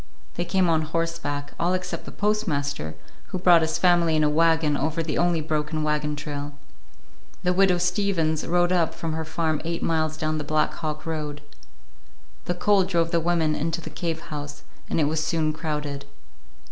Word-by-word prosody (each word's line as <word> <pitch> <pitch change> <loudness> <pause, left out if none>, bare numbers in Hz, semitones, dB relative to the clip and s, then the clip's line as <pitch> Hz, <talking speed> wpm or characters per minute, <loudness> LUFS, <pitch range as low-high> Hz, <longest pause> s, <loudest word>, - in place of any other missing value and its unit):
They 175 - -2
came 185 0 +2
on 160 -1 +3
horseback, 155 -3 -2
all 175 +2 +2
except 180 -1 -4
the - - -8
postmaster, 145 - -1 0.3
who 190 - -3
brought 175 -2 +6
his 160 0 0
family 170 -2 +4
in 155 - +3
a 150 - +3
wagon 160 -1 +3
over 155 +3 -1
the 155 -2 -2
only 175 -2 +2
broken 155 0 -1
wagon 150 0 0
trail. 145 -1 -5 0.9
The 180 0 +2
Widow 190 0 +4
Steavens 175 -3 +1
rode 175 +1 +3
up 175 -3 +2
from 165 -1 -3
her 160 0 -2
farm 155 -1 -1
eight 170 +1 -3
miles 155 -1 0
down 155 -1 -1
the - - -3
Black 155 +1 +1
Hawk 155 -2 -4
road. 150 -2 -4 1.0
The 175 - -1
cold 195 +1 +3
drove 170 -3 +1
the 170 - +3
women 165 -2 +1
into 165 +3 -1
the 165 - -8
cave 165 -3 -3
house, 145 0 -6 0.3
and - - +1
it - - +4
was 155 +1 0
soon 155 -1 0
crowded. 150 -3 -4
160 Hz, 180 wpm, -25 LUFS, 150-175 Hz, 1.0 s, brought